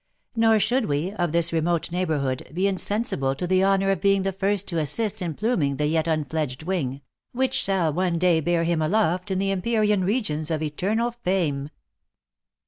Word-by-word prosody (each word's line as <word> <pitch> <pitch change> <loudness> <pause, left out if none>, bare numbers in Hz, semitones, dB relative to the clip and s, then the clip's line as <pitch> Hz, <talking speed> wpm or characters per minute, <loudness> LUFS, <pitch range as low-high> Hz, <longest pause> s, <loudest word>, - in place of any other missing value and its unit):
Nor 225 -1 +4
should 245 +2 +1
we, 150 +6 -1
of 175 -5 -2
this 170 0 +2
remote 165 0 0
neighbourhood, 155 -8 -2
be 185 +2 +1
insensible 200 - 0
to 160 - -3
the 185 +1 +2
honour 195 0 +3
of 195 - -1
being 195 -1 +3
the 195 - 0
first 195 +1 -1
to 170 -3 -1
assist 210 +7 0
in 170 -4 -3
pluming 185 - 0
the 150 - 0
yet 160 +2 +1
unfledged 155 -3 -2
wing, 145 -7 -2 0.3
which 260 +1 0
shall 185 -6 +1
one 180 0 0
day 175 -1 +3
bear 170 +1 +1
him 165 -1 0
aloft 180 +2 +1
into 190 0 0
the 195 0 0
empyrean 210 0 +1
regions 180 -7 -1
of 160 -1 -1
eternal 210 +10 -1
fame." 180 -11 -1
180 Hz, 180 wpm, -24 LUFS, 155-200 Hz, 0.3 s, Nor